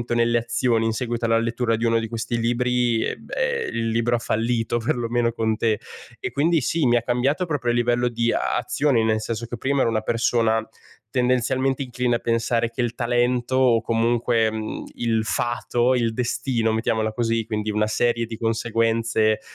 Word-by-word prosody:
nelle 120 Hz, 0 st, +3 dB
azioni 115 Hz, 0 st, 0 dB
in 115 Hz, -, +1 dB
seguito 120 Hz, +1 st, -2 dB
alla 115 Hz, 0 st, +3 dB
lettura 115 Hz, 0 st, 0 dB
di 115 Hz, +1 st, -2 dB
uno 115 Hz, 0 st, +3 dB
di 115 Hz, -, -3 dB
questi 115 Hz, +1 st, -3 dB
libri, 120 Hz, 0 st, +1 dB, 0.2 s
beh, 480 Hz, -2 st, -2 dB
il 115 Hz, -1 st, -1 dB
libro 115 Hz, +1 st, +1 dB
ha -, -, -1 dB
fallito, 115 Hz, +1 st, -1 dB
perlomeno 120 Hz, 0 st, 0 dB
con 110 Hz, -1 st, 0 dB
te. 110 Hz, -1 st, 0 dB, 0.4 s
E -, -, -4 dB
quindi, 160 Hz, +2 st, +2 dB
sì, 160 Hz, +4 st, 0 dB
mi 120 Hz, -, +4 dB
ha 120 Hz, -, +1 dB
cambiato 130 Hz, +9 st, 0 dB
proprio 135 Hz, -7 st, -1 dB
a -, -, 0 dB
livello 120 Hz, 0 st, +2 dB
di 115 Hz, 0 st, 0 dB
azione, 125 Hz, 0 st, +1 dB
nel 110 Hz, 0 st, +1 dB
senso 115 Hz, +1 st, -4 dB
che 120 Hz, -, -6 dB
prima 135 Hz, +3 st, 0 dB
ero 115 Hz, -, +2 dB
una 110 Hz, -1 st, 0 dB
persona 115 Hz, -1 st, +1 dB, 0.4 s
tendenzialmente 130 Hz, +2 st, +1 dB
incline 125 Hz, -1 st, -1 dB
a -, -, -1 dB
pensare 115 Hz, 0 st, 0 dB
che 115 Hz, +2 st, -4 dB
il 120 Hz, -1 st, -1 dB
talento 120 Hz, +1 st, 0 dB
o 125 Hz, -3 st, +4 dB
comunque, 115 Hz, 0 st, +1 dB
mhmm, 110 Hz, -1 st, -5 dB
il 115 Hz, -2 st, 0 dB
fato, 120 Hz, +2 st, 0 dB
il 115 Hz, -2 st, 0 dB
destino, 120 Hz, -1 st, -1 dB
mettiamola 110 Hz, -1 st, 0 dB
così, 115 Hz, -1 st, 0 dB
quindi 105 Hz, 0 st, -2 dB
una 105 Hz, +1 st, +1 dB
serie 115 Hz, +1 st, +1 dB
di 115 Hz, -1 st, -7 dB
conseguenze, 115 Hz, -1 st, +1 dB
115 Hz, 180 wpm, -23 LUFS, 115-120 Hz, 0.4 s, mi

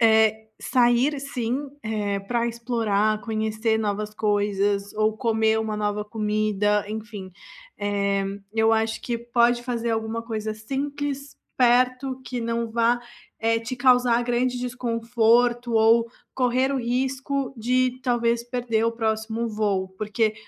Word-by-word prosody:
eh, 220 Hz, -1 st, +4 dB
sair 245 Hz, +3 st, +3 dB
assim, 270 Hz, 0 st, -3 dB
eh, 210 Hz, -2 st, -1 dB
pra 235 Hz, +4 st, -1 dB
explorar, 225 Hz, -3 st, 0 dB
conhecer 220 Hz, +1 st, -1 dB
novas 210 Hz, 0 st, -2 dB
coisas 205 Hz, -1 st, 0 dB
ou 215 Hz, 0 st, +1 dB
comer 220 Hz, -1 st, +2 dB
uma 220 Hz, -1 st, -3 dB
nova 210 Hz, 0 st, -1 dB
comida, 210 Hz, -1 st, 0 dB
enfim. 210 Hz, -3 st, -6 dB, 0.5 s
Eh, 200 Hz, -1 st, 0 dB, 0.3 s
eu 220 Hz, 0 st, +3 dB
acho 220 Hz, 0 st, 0 dB
que 235 Hz, -1 st, -2 dB
pode 240 Hz, 0 st, +2 dB
fazer 235 Hz, -2 st, -2 dB
alguma 225 Hz, 0 st, -2 dB
coisa 220 Hz, -2 st, -4 dB
simples, 280 Hz, +4 st, -4 dB, 0.2 s
perto, 255 Hz, +1 st, +2 dB
que 250 Hz, -1 st, -4 dB
não 230 Hz, 0 st, -2 dB
vá, 235 Hz, +1 st, +2 dB, 0.4 s
eh, 225 Hz, 0 st, +2 dB
te 230 Hz, +3 st, -5 dB
causar 245 Hz, -1 st, +4 dB
grande 245 Hz, +1 st, 0 dB
desconforto 240 Hz, 0 st, +1 dB
ou 225 Hz, +1 st, +5 dB, 0.3 s
correr 255 Hz, +1 st, +2 dB
o 275 Hz, -, 0 dB
risco 265 Hz, +3 st, -1 dB
de 255 Hz, +2 st, +1 dB
talvez 235 Hz, -2 st, +1 dB
perder 240 Hz, -2 st, -1 dB
o 230 Hz, -, +1 dB
próximo 220 Hz, 0 st, -1 dB
voo. 205 Hz, -3 st, -1 dB
Porque, 215 Hz, +1 st, 0 dB
230 Hz, 130 wpm, -24 LUFS, 215-245 Hz, 0.5 s, ou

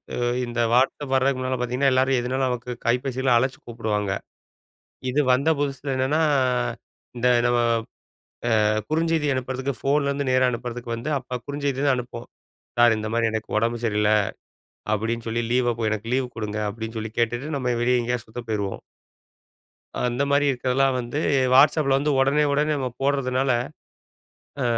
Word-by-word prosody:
இ -, -, -4 dB, 0.3 s
இந்த 120 Hz, 0 st, -5 dB
வாட்ஸ்அப் 135 Hz, +2 st, +1 dB
வர்றதுக்கு 130 Hz, 0 st, +2 dB
முன்னால 130 Hz, 0 st, -1 dB
பார்த்தீங்கன்னா, 125 Hz, +2 st, +1 dB
எல்லாரும் 130 Hz, 0 st, +3 dB
எதுனாலும் 130 Hz, +2 st, -1 dB
நமக்கு 125 Hz, 0 st, -3 dB
கைப்பேசில 125 Hz, +1 st, +1 dB
அழைச்சு 130 Hz, +2 st, 0 dB
கூப்பிடுவாங்க. 110 Hz, -4 st, -2 dB, 1.0 s
இது 140 Hz, +4 st, 0 dB
வந்த 140 Hz, +5 st, +2 dB
புதுசில 140 Hz, -1 st, -2 dB
என்னன்னா, 140 Hz, +5 st, +1 dB, 1.0 s
இந்த 125 Hz, +1 st, +1 dB, 0.2 s
நம்ம. 120 Hz, 0 st, +3 dB, 1.1 s
அ -, -, +4 dB, 0.2 s
குறுஞ்செய்தி 160 Hz, -1 st, +1 dB
அனுப்புறதுக்கு, 130 Hz, +1 st, -3 dB
ஃபோன்லருந்து 140 Hz, -1 st, +1 dB
நேரா 130 Hz, 0 st, +4 dB
அனுப்புறதுக்கு 120 Hz, 0 st, -4 dB
வந்து, 125 Hz, +7 st, -4 dB
அப்போ 125 Hz, 0 st, -6 dB
குறுஞ்செய்தி 140 Hz, -2 st, -2 dB
தான் 135 Hz, -2 st, +4 dB
அனுப்புவோம் 120 Hz, -1 st, -7 dB, 0.5 s
"சார்" 120 Hz, -2 st, +6 dB
இந்த 110 Hz, -, -4 dB
மாதிரி 115 Hz, -1 st, +2 dB
"எனக்கு 110 Hz, 0 st, -4 dB
ஒடம்பு 115 Hz, +2 st, 0 dB, 0.9 s
சரியில்ல"அப்டின்னு 115 Hz, +2 st, -3 dB
சொல்லி 115 Hz, +1 st, -1 dB
லீவ 120 Hz, -2 st, +2 dB, 0.2 s
"எனக்கு 110 Hz, +1 st, -3 dB
லீவு 130 Hz, -1 st, 0 dB
குடுங்க" 105 Hz, -1 st, -3 dB
அப்டின்னு 110 Hz, +1 st, -6 dB
சொல்லி 110 Hz, 0 st, -5 dB
கேட்டுட்டு 120 Hz, +6 st, -1 dB
நம்ம 125 Hz, -2 st, 0 dB
வெளிய 125 Hz, 0 st, +3 dB
எங்கேயாவது 120 Hz, -1 st, -3 dB
சுத்த 115 Hz, +2 st, -6 dB
போயிருவோம். 100 Hz, -3 st, -2 dB, 1.2 s
அந்த 125 Hz, +3 st, 0 dB
மாரி 145 Hz, +1 st, +3 dB
இருக்கிறதுலாம் 130 Hz, +1 st, +1 dB
வந்து 120 Hz, +5 st, -3 dB, 0.3 s
வாட்ஸ்அப்ல 140 Hz, 0 st, +5 dB
வந்து, 145 Hz, +2 st, 0 dB
ஒடனே, 140 Hz, +3 st, +3 dB
ஒடனே 150 Hz, +2 st, +1 dB
நம்ம 130 Hz, -2 st, -2 dB
போட்றதுனால. 135 Hz, -1 st, +1 dB, 1.1 s
அ -, -, +1 dB
125 Hz, 145 wpm, -24 LUFS, 120-135 Hz, 1.2 s, சார்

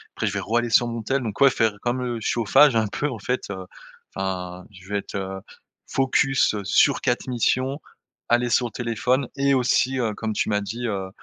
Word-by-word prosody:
Après -, -, -1 dB
je -, -, 0 dB
vais -, -, -1 dB
raller 120 Hz, +2 st, 0 dB
sur 120 Hz, +2 st, +4 dB
mon 115 Hz, -1 st, -4 dB
téléphone. 135 Hz, +4 st, 0 dB
Donc 110 Hz, -4 st, -5 dB
ouais, 140 Hz, -, +8 dB
faire 110 Hz, -4 st, +1 dB
comme 125 Hz, +1 st, -1 dB
le 120 Hz, -2 st, -3 dB
chauffage, 120 Hz, +5 st, +4 dB
un 110 Hz, -1 st, +2 dB
peu, 145 Hz, +8 st, -2 dB
en 115 Hz, -, -6 dB
fait, 125 Hz, +2 st, -3 dB
heu, 95 Hz, -2 st, -6 dB, 0.5 s
enfin, 90 Hz, -1 st, -4 dB
je 95 Hz, -1 st, -15 dB
vais 100 Hz, 0 st, 0 dB
être, -, -, -9 dB
heu, 95 Hz, 0 st, -4 dB, 0.5 s
focus 135 Hz, -2 st, +2 dB
sur 95 Hz, -, +3 dB
4 120 Hz, -, -1 dB
missions, 130 Hz, +3 st, 0 dB, 0.5 s
aller 120 Hz, 0 st, +2 dB
sur 120 Hz, +1 st, +2 dB
le 115 Hz, -, -11 dB
téléphone 125 Hz, +2 st, -1 dB
et 140 Hz, 0 st, +2 dB
aussi, 130 Hz, 0 st, +2 dB
heu, 110 Hz, -3 st, 0 dB
comme 110 Hz, 0 st, -3 dB
tu -, -, -1 dB
m'as 105 Hz, -1 st, +1 dB
dit, 115 Hz, +4 st, -4 dB
heu, 95 Hz, -3 st, -3 dB
120 Hz, 210 wpm, -23 LUFS, 105-130 Hz, 0.5 s, ouais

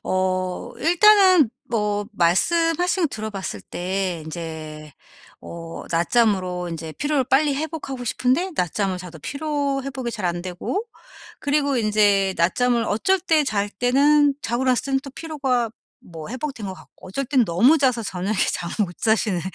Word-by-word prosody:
어 185 Hz, -1 st, -1 dB
일단은 365 Hz, -, +5 dB, 0.2 s
뭐 210 Hz, -3 st, -1 dB
말씀하신 330 Hz, -, +2 dB
거 -, -, +5 dB
들어봤을 210 Hz, -, -5 dB
때 180 Hz, -, -3 dB
인제 155 Hz, -2 st, -7 dB, 0.5 s
어 165 Hz, -1 st, -8 dB
낮잠으로 180 Hz, -1 st, +1 dB
인제 160 Hz, -1 st, -6 dB
피로를 290 Hz, -2 st, 0 dB
빨리 275 Hz, +3 st, +2 dB
회복하고 285 Hz, -4 st, -5 dB
싶은데 255 Hz, -, 0 dB
낮잠을 185 Hz, +2 st, -1 dB
자도 180 Hz, -3 st, -9 dB
피로 285 Hz, -, -2 dB
회복이 260 Hz, -3 st, -4 dB
잘 215 Hz, -5 st, -6 dB
안 175 Hz, 0 st, -1 dB
되고 185 Hz, -, -3 dB, 0.6 s
그리고 285 Hz, -1 st, +1 dB
인제 205 Hz, -3 st, +3 dB
낮잠을 235 Hz, +8 st, +2 dB
어쩔 375 Hz, -, +1 dB
때 320 Hz, -4 st, +2 dB
잘 205 Hz, -6 st, -1 dB
때는 280 Hz, +6 st, +3 dB
자고 240 Hz, +2 st, -1 dB
났을 255 Hz, -2 st, +2 dB
때는 270 Hz, -1 st, +1 dB
또 275 Hz, -, -9 dB
피로가 265 Hz, -7 st, -1 dB, 0.3 s
뭐 160 Hz, -3 st, -10 dB
회복된 255 Hz, -4 st, -5 dB
것 190 Hz, -, -4 dB
같고 185 Hz, -, -15 dB
어쩔 275 Hz, +9 st, -3 dB
땐 260 Hz, -2 st, +3 dB
너무 215 Hz, -, +4 dB
자서 255 Hz, -5 st, +2 dB
저녁에 195 Hz, +1 st, -3 dB, 0.2 s
잠을 175 Hz, -1 st, -4 dB
못 175 Hz, -, -12 dB
자시는 220 Hz, -4 st, +1 dB
230 Hz, 300 characters per minute, -22 LUFS, 185-280 Hz, 0.6 s, 일단은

